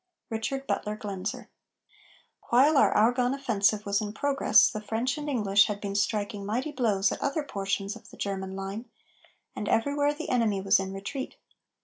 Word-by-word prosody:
RICHARD 270 +5 -3
BUTLER 210 -5 -2
GLAENZER. 200 -1 -5 1.0
While 275 +6 +5
our 275 - +5
Argonne 245 +4 +3
offensive 215 -6 +1
was 200 +1 +1
in 210 -1 -4
progress, 280 +4 +4
the 215 - -4
French 230 +5 -1
and 300 -1 -5
English 205 -6 +4
had 210 -1 -3
been 200 -1 -4
striking 205 0 -1
mighty 245 +9 -2
blows 210 -8 +1
at - - -5
other 280 +2 -1
portions 200 -4 -3
of 225 - -14
the - - -14
German 190 -1 -3
line, 195 +5 -6 0.7
and 210 - -3
everywhere 285 +4 +2
the - - -6
enemy 225 -5 +1
was 195 +2 +4
in 190 0 -4
retreat. 200 +8 -5
215 Hz, 165 wpm, -28 LUFS, 200-255 Hz, 1.0 s, While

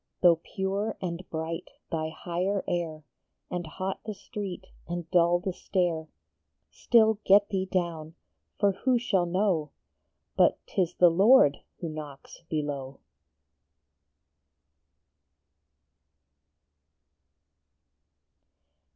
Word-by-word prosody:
Though 175 -2 +6
pure 195 +5 -3
and 180 -1 -5
bright 160 +1 -4 0.2
thy 160 -1 -1
higher 180 +5 -2
air, 160 -3 -3 0.5
And 175 -2 -3
hot 185 +5 -4
the 215 -1 -5
street 195 -4 -6 0.2
and 175 -1 -4
dull 175 -1 +4
the 185 +1 -3
stair, 175 -4 -1 0.6
Still 220 -3 +3
get 200 +1 +5
thee 190 -1 -1
down, 170 -4 -2 0.4
for 200 -1 +3
who 250 +6 +1
shall 195 -7 +1
know 180 -4 +1 0.7
But - - +4
t - - -1
is 175 -1 -1
the 175 -1 +6
Lord 190 - +6 0.2
who 170 - -3
knocks 150 -2 -9
below 140 -3 -3
175 Hz, 100 wpm, -28 LUFS, 160-195 Hz, 0.7 s, Though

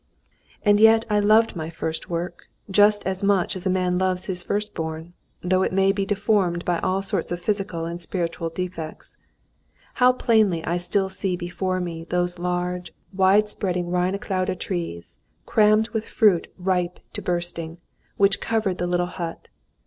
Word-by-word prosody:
And 205 -1 +4
yet 225 +1 +6
I 210 - +3
loved 215 +2 +4
my 160 -1 -4
first 160 -1 -5
work, 175 0 -4 0.2
just 205 +1 +4
as 190 -1 -1
much 200 -3 +2
as 185 0 -3
a - - +2
man 180 -1 +1
loves 185 -1 0
his 180 -2 -3
first 210 +3 -2
born, 160 +1 -5 0.3
though 185 +1 +2
it - - +1
may 195 +1 +3
be 195 -1 -2
deformed 195 -4 +1
by 175 -1 +1
all 190 +1 0
sorts 195 -3 -1
of 175 - -2
physical 190 -3 -2
and 170 +1 -5
spiritual 170 -2 -3
defects. 165 -2 -6 0.9
How 250 0 +7
plainly 215 -9 +2
I 170 +2 0
still 185 +2 +1
see 190 -1 -2
before 185 +1 -2
me 165 -2 -5
those 175 0 -1
large, 180 0 -3 0.2
wide 195 +2 +4
spreading 180 -4 -2
Reineclaude 185 +1 -1
trees, 165 - -5 0.3
crammed 215 +1 +3
with 220 -1 -3
fruit 205 -7 +3
ripe 180 -1 -1
to - - -4
bursting, 170 -2 -2 0.4
which 200 0 +3
covered 220 -5 -1
the 175 - -1
little 175 0 +1
hut. 170 -2 -6
185 Hz, 165 wpm, -23 LUFS, 175-200 Hz, 0.9 s, How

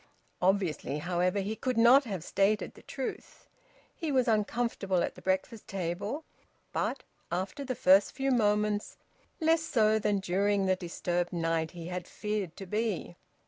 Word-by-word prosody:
Obviously, 180 -7 +1
however, 180 +4 0
he 205 +3 -3
could 255 +1 -2
not 250 +5 +7
have 190 -8 -4
stated 200 +3 +1
the - - -15
truth. 265 -2 -6 0.5
He 320 -3 -3
was 255 -3 +2
uncomfortable 210 -4 +1
at - - -2
the - - -13
breakfast 190 +4 -1
table, 195 - -3 0.5
but, - - -1 0.3
after 190 - -2
the 255 -2 -3
first 190 0 +5
few 270 0 0
moments, 210 -3 +1 0.4
less 325 0 +3
so 220 -8 +3
than 205 -1 +1
during 195 +1 +1
the 190 0 +3
disturbed 175 0 -2
night 165 -2 0
he 170 -2 -9
had 180 0 -5
feared 210 -5 -3
to 195 - -7
be. 210 -3 -2
200 Hz, 150 wpm, -30 LUFS, 180-230 Hz, 0.5 s, not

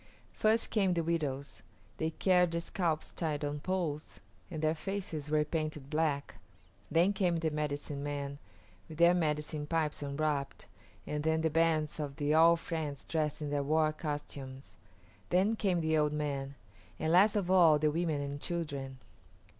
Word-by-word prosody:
First 220 +1 +2
came 195 -5 +2
the 170 - +1
widows. 145 -4 -2 0.4
They 160 - 0
carried 180 +1 +3
the 170 0 -1
scalps 165 -3 -1
tied 150 -3 -2
on 145 0 -3
poles, 165 -3 -3 0.3
and 160 - -5
their 155 0 +3
faces 165 -4 -4
were 150 0 +2
painted 155 -2 -3
black. 150 -2 -1 0.5
Then 170 +5 +3
came 180 -4 +1
the 160 -1 -1
medicine 145 -1 -3
men, 140 -1 -4 0.5
with 155 - -9
their 170 +1 +6
medicine 150 -3 -1
pipes 155 -2 -1
unwrapped, 140 -1 -2 0.4
and 150 0 -3
then 160 0 +2
the 160 -1 +1
bands 160 -1 +1
of 145 -2 -4
the 145 +1 0
All 165 +2 +7
Friends 155 -4 -4
dressed 155 -1 -1
in 145 - -3
their 145 -1 +1
war 155 +2 +2
costumes; 145 -4 -6 0.5
then 195 +5 +3
came 185 -5 +1
the 160 0 +1
old 150 0 +1
men; 140 -2 -3 0.4
and, 160 - -1
last 195 +5 +6
of 190 -3 0
all, 170 -5 +6
the 150 0 +2
women 160 -2 0
and 140 0 -5
children. 140 -6 -4
155 Hz, 160 wpm, -32 LUFS, 145-170 Hz, 0.5 s, All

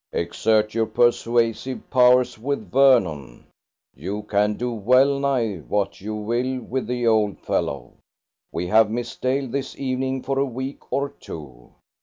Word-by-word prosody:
"Exert 105 +5 +1
your 115 0 +1
persuasive 120 +1 +1
powers 125 0 +4
with 115 -6 -3
Vernon. 90 - +2 0.5
You 95 +9 -5
can 105 0 +1
do 125 +2 -3
well 130 +6 +3
nigh 125 -8 0
what 100 +5 -2
you 110 +2 -4
will 120 +5 -1
with 125 -1 -4
the 120 0 -2
old 110 -3 +2
fellow. 70 -4 -3 0.5
We 85 - -3
have 110 +3 +4
Miss 120 +2 -4
Dale 135 +1 -1
this 135 +2 -4
evening 130 0 -2
for 135 0 -1
a - - +3
week 130 +2 -7
or 140 +1 0
two. 70 - -11
115 Hz, 145 wpm, -23 LUFS, 105-130 Hz, 0.5 s, powers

